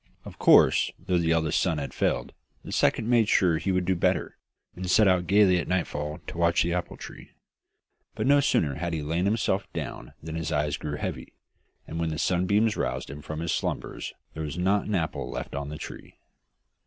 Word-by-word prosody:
Of - - -11
course, - - +6
though 90 -1 0
the 85 -1 +1
eldest 80 -2 +2
son 85 -4 +1
had 70 -2 -4
failed, - - -1 0.3
the - - -8
second 110 - +2
made 115 -3 +3
sure 90 -3 +4
that 80 - -1
he 95 - +2
would 90 -1 +1
do 95 - +2
better, 85 - 0 0.4
and 90 0 -5
set 105 +3 +5
out 90 -2 +2
gaily 95 -1 +5
at - - -4
nightfall 75 -3 -2
to 85 - -7
watch 85 0 +3
the 85 - -1
apple 90 0 -3
tree. - - -11 0.8
But - - -2
no 145 +2 +5
sooner 80 - +2
had 85 +4 -3
he 80 -2 -2
lain 85 +5 -1
himself 100 -2 0
down - - -6
than 80 0 -6
his 80 -1 -3
eyes 75 -1 0
grew 75 -1 -5
heavy, - - -5 0.5
and 80 - -6
when 85 -1 0
the 80 - -3
sunbeams 100 +6 +2
roused - - -3
him 75 +1 -8
from 80 +2 -6
his 85 -1 -1
slumbers - - -3 0.2
there 80 - -6
was 75 0 -4
not 95 +3 +1
an 105 - 0
apple 80 -4 -2
left - - -6
on 70 0 -4
the 75 - -6
tree. - - -9
85 Hz, 210 wpm, -27 LUFS, 80-95 Hz, 0.8 s, course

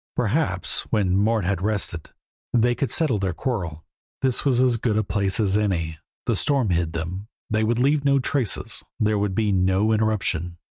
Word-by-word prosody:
Perhaps, - - 0
when 95 -4 +1
Mort 105 0 +2
had 95 -1 0
rested, 100 -5 -2 0.4
they 120 0 +3
could 135 +2 -2
settle 145 - +1
their 95 -3 -1
quarrel; 85 - -3 0.4
this 130 -2 +1
was 130 -4 +2
as 125 -2 +3
good 110 -2 0
a 110 - +2
place 100 0 -1
as 100 -3 +2
any. 85 -7 0 0.3
The - - +1
storm 135 -8 +1
hid 85 -2 0
them, 90 +5 -4 0.2
they 110 0 +2
would 115 +2 +1
leave 140 +3 +2
no 140 -1 +4
traces, 130 -3 -1 0.2
there 105 -1 +2
could 100 -2 -1
be 105 -1 +1
no 95 +3 +2
interruption. 100 -6 0
105 Hz, 180 wpm, -24 LUFS, 95-120 Hz, 0.4 s, no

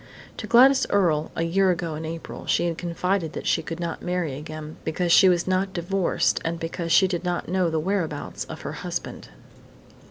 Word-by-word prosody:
To - - -6
Gladys 260 +3 +6
Earle, 160 -6 +2
a 165 - -1
year 190 +3 +2
ago 170 -2 -1
in 155 +1 -5
April, 165 +1 -7
she - - +2
had 170 -1 -1
confided 175 0 -2
that - - -6
she - - +2
could 165 - -6
not 170 -1 -4
marry 180 -5 -2
again, 155 +1 -8
because 170 +2 -1
she 190 +2 +7
was 175 -1 +2
not 185 +1 0
divorced 180 +2 0
and 165 +1 -2
because 165 +1 -4
she 190 +3 +6
did 180 -2 -3
not 175 -1 -2
know 180 -1 +1
the 160 -1 0
whereabouts 165 -4 -2
of - - -9
her - - -5
husband. - - -5
170 Hz, 195 wpm, -24 LUFS, 165-185 Hz, -, she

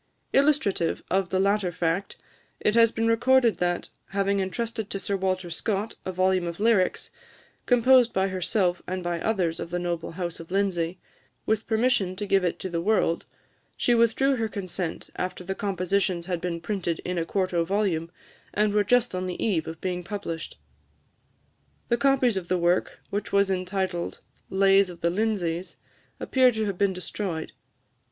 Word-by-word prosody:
Illustrative 275 - +2
of 190 -1 +1
the 185 - +1
latter 200 -1 +2
fact, 175 +3 -1 0.4
it 210 - +2
has 230 0 +5
been 225 0 -1
recorded 240 +1 +4
that, 175 0 -1 0.2
having 200 0 0
entrusted 220 +2 -3
to - - -3
Sir 200 0 -2
Walter 185 -2 -1
Scott 205 +5 -2
a 185 - -2
volume 185 -1 +1
of 170 +1 -5
lyrics, 210 -4 +2 0.6
composed 245 0 +5
by 190 +1 +1
herself 185 0 0
and 185 0 -3
by 175 -1 -2
others 180 -7 0
of 165 - -5
the 175 - -2
noble 175 -2 -3
house 175 -1 -4
of 165 - -10
Lindsay, 185 -3 0 0.5
with 220 0 0
permission 220 -5 +2
to 205 +2 -3
give 195 -1 +2
it 175 - 0
to - - -5
the 170 -2 -2
world, 185 -4 +1 0.5
she 240 - +2
withdrew 240 +4 +3
her 225 -1 0
consent 185 -4 -5
after 180 0 -3
the 190 +2 -3
compositions 190 -2 -1
had 175 -2 -2
been 175 -2 -2
printed 175 -3 -2
in 180 -1 -1
a - - 0
quarto 185 -1 0
volume, 175 -3 0 0.5
and 210 0 +2
were 210 0 +3
just 245 +2 +2
on 185 0 -2
the 180 - -3
eve 180 -8 0
of 160 0 -6
being 180 -1 -2
published. 175 -4 -5 1.3
The 235 - +3
copies 255 -3 +3
of 180 -2 -4
the 185 - +1
work, 175 +1 +1
which 205 +1 -3
was 200 -1 +3
entitled 185 -1 -2 0.3
"Lays 195 0 +4
of 175 - -11
the 170 - +2
Lindsays," 185 -4 -1 0.4
appear 255 -1 +4
to 220 0 -1
have 195 -3 -3
been 200 -1 +3
destroyed. 180 -2 -4
190 Hz, 170 wpm, -26 LUFS, 175-215 Hz, 1.3 s, has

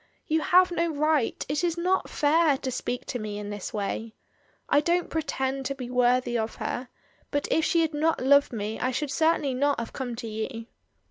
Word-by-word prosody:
"You 315 -2 +1
have 365 +3 +5
no 340 -1 +1
right, 305 -4 0
it 290 +4 -1
is 345 -1 0
not 365 +2 +1
fair, 300 -1 +3
to 260 -1 -4
speak 245 0 -3
to 245 - -4
me 210 -1 -5
in 205 0 -5
this 205 -2 -5
way. 220 +2 -3 0.5
I 290 - +4
don't 345 +3 0
pretend 270 -4 -2
to 275 - -3
be 250 -2 -7
worthy 250 -1 +2
of 220 0 -3
her, 250 0 -4 0.4
but 290 -1 -1
if 320 - +3
she 335 - +3
had 320 -1 0
not 315 +2 +1
loved 280 +2 +4
me 220 -1 -4
I 255 - 0
should 275 +2 -2
certainly 315 -3 +2
not 280 +1 +1
have 230 - -5
come 250 -3 -4
to 230 0 -6
you." 225 +2 -4
275 Hz, 205 wpm, -27 LUFS, 240-315 Hz, 0.5 s, have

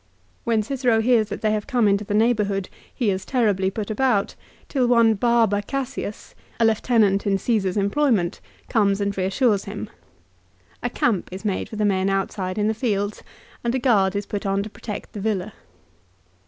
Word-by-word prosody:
When 225 -2 +2
Cicero 245 -1 +1
hears 225 -2 +3
that - - -5
they 215 - +2
have 215 -1 -2
come 245 -6 +2
into 200 +1 +2
the 205 0 -2
neighbourhood 210 -4 +1 0.2
he 225 -5 0
is 190 0 -3
terribly 205 -7 +1
put 210 +2 -4
about, 215 -3 +1 0.3
till 260 -4 +1
one 235 -2 +5
Barba 225 -2 +2
Cassius, 260 -3 -5 0.3
a 230 - +4
lieutenant 215 -3 +2
in 195 -1 +2
Caesar's 195 -2 0
employ 205 +9 +2
ment, 180 -8 0 0.3
comes 200 -3 +2
and 200 0 -1
reassures 195 +2 +1
him. 205 +2 -6 0.9
A 245 - -1
camp 225 -5 0
is 190 +3 -8
made 200 -3 -1
for - - -8
the 210 0 0
men 190 -1 +1
outside 195 -1 -2
in 210 0 +1
the 220 - +1
fields, 210 -3 -2 0.4
and 235 +1 0
a - - +1
guard 205 -6 +3
is 200 0 -2
put 205 -1 -4
on 195 0 0
to 215 - -8
protect 210 -1 -7
the 205 - -6
villa. 210 -1 -2
210 Hz, 180 wpm, -23 LUFS, 195-235 Hz, 0.9 s, one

